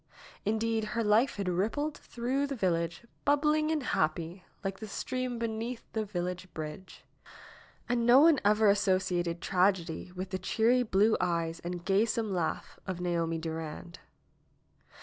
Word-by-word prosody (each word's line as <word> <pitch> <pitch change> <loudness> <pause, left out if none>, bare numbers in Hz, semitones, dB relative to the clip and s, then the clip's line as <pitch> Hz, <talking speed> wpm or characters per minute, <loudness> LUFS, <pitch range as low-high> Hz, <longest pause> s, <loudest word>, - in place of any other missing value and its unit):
Indeed, 220 +1 0
her 230 - +2
life 220 +5 +3
had 200 -2 -3
rippled 225 - 0
through 260 +4 -2
the 275 - -3
village, 170 -1 -1 0.2
bubbling 300 +2 +3
and 315 -3 0
happy, 165 0 -1 0.2
like 195 -1 -3
the 220 - -6
stream 255 +4 -3
beneath 230 +1 -3
the 220 - 0
village 180 -2 -4
bridge. 155 +4 -7 0.8
And 240 -1 +1
no 245 +3 +7
one 315 -3 +6
ever 210 +1 +4
associated 185 -4 +1
tragedy 180 -3 +1
with 185 0 -6
the 185 - -2
cheery 235 +6 +2
blue 215 -1 +3
eyes 170 -2 -1
and 175 0 -6
gaysome 215 +2 +1
laugh 175 -3 -3
of 185 -2 -3
Naomi 170 -2 0
Durand. 160 +1 -6
195 Hz, 140 wpm, -30 LUFS, 175-235 Hz, 0.8 s, no